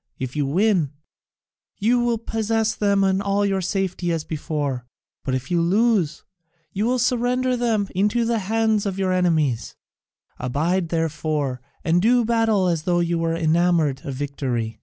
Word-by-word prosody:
If 130 +1 -5
you 145 -2 0
win, 175 -2 +2 0.8
you 235 +4 +2
will 240 -1 +1
possess 225 0 -1
them 200 -2 +2 0.2
all 200 0 +1
in 195 -1 +1
safety 185 -1 -1
as 165 -2 -1
before, 145 -5 -3 0.4
but 130 - -1
if 130 +4 -5
you 170 -1 +2
lose, 195 -2 +1 0.5
you 205 +3 0
must 250 0 +2
surrender 250 0 +1
them 225 -4 0
into 210 +5 +1
the 230 -1 +1
hands 220 +1 +1
of 195 -1 -3
your 190 -1 0
enemies. 160 -9 +1 0.6
Abide, 160 +8 0
therefore, 155 -5 -1 0.2
and 170 +2 +2
do 240 +3 +3
battle 225 -4 +2
as 170 -3 0
though 175 +2 +1
you 170 -1 0
were 165 0 0
enamoured 165 -3 +2
of 140 - -5
victory. 130 -5 -3
180 Hz, 155 wpm, -22 LUFS, 155-220 Hz, 0.8 s, do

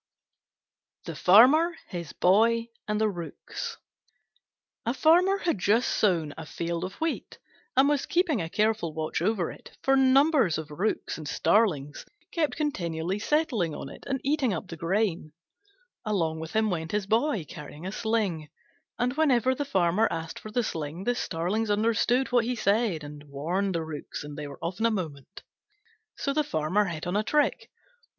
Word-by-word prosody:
THE - - -5
FARMER, 275 - +6
HIS 170 -4 -5
BOY, 230 +5 +3 0.2
AND 210 0 0
THE 220 - +3
ROOKS 205 - -6 1.1
A 235 +3 -1
Farmer 355 +7 +4
had 335 - -1
just 220 +6 +2
sown 165 -8 +1
a 160 - -7
field 170 0 -3
of 185 - -4
wheat, 325 0 -3 0.4
and 270 +1 +6
was 290 -1 +1
keeping 345 - +1
a 165 - -4
careful 210 -6 0
watch 155 0 -2
over 190 -2 0
it, - - -14
for 270 - +4
numbers 270 - +4
of 155 -1 -6
Rooks 180 +2 -2
and 155 - -7
starlings 150 -8 +1 0.3
kept 315 -3 0
continually 180 - -2
settling 235 - 0
on 135 - -7
it - - -12
and 270 -1 -1
eating 275 -7 +1
up 175 +2 -6
the 165 - -6
grain. 170 -2 -1 0.7
Along 170 -8 -1
with 160 0 -7
him 220 -1 +2
went 165 -1 -3
his 210 -1 0
Boy, 220 - +1
carrying 150 +3 -9
a 190 - -3
sling: 205 -9 -1 0.5
and 250 +1 0
whenever 260 -5 +3
the 285 +2 -3
Farmer 190 -3 +2
asked 165 0 -5
for 215 - -9
the 240 +3 0
sling 160 -2 -4
the 245 - +1
starlings 205 +2 -2
understood 230 +5 +2
what 240 -2 +3
he 250 +1 -1
said 205 -6 +1
and 145 0 -10
warned 170 +7 -2
the 165 - -1
Rooks 155 -2 -6
and 145 0 -8
they 150 0 -5
were 140 - -9
off 175 +4 -3
in 230 - +3
a - - +2
moment. 165 - -5 0.7
So 280 - -1
the 305 +1 +2
Farmer 170 - +1
hit 165 -3 -5
on 180 +2 -2
a 210 - +3
trick. 295 +7 0
205 Hz, 170 wpm, -27 LUFS, 165-245 Hz, 1.1 s, FARMER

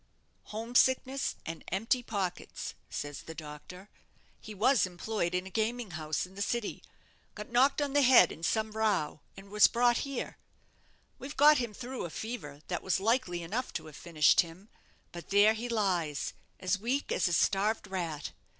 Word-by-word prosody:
'Home 225 +3 -6
sickness 260 +1 +2
and 165 0 -6
empty 225 +7 0
pockets,' 195 -6 -4 0.2
says 145 -1 -5
the 160 - -9
doctor; 160 +5 -10 0.5
'he 215 - -10
was 230 0 +3
employed 180 0 -2
in 180 +1 -1
a - - -7
gaming 225 0 -1
house 155 0 -2
in 185 - -16
the 200 - -7
city, 235 +1 -2 0.5
got 210 +2 -8
knocked 270 +4 +4
on 280 -1 -3
the 290 - +4
head 255 -2 +7
in 160 - -10
some 220 +5 0
row, 210 -9 0 0.2
and 195 +1 -12
was 210 0 +7
brought 240 0 +3
here. 275 -3 -4 0.8
We've 280 +2 -8
got 295 0 +7
him 235 -4 -3
through 255 -4 -5
a - - -5
fever 160 -9 -6
that 175 -2 -2
was 190 - 0
likely 195 -5 0
enough 225 +10 -3
to - - -4
have 155 -2 -11
finished 155 -3 +4
him; 175 +5 -11 0.4
but 170 -1 -9
there 205 +2 +6
he 235 +2 -5
lies, 180 -10 0 0.3
as 185 +2 0
weak 255 +7 -1
as - - +2
a 175 - -1
starved 205 +6 +2
rat. 170 -7 -4
205 Hz, 175 wpm, -31 LUFS, 175-240 Hz, 0.8 s, head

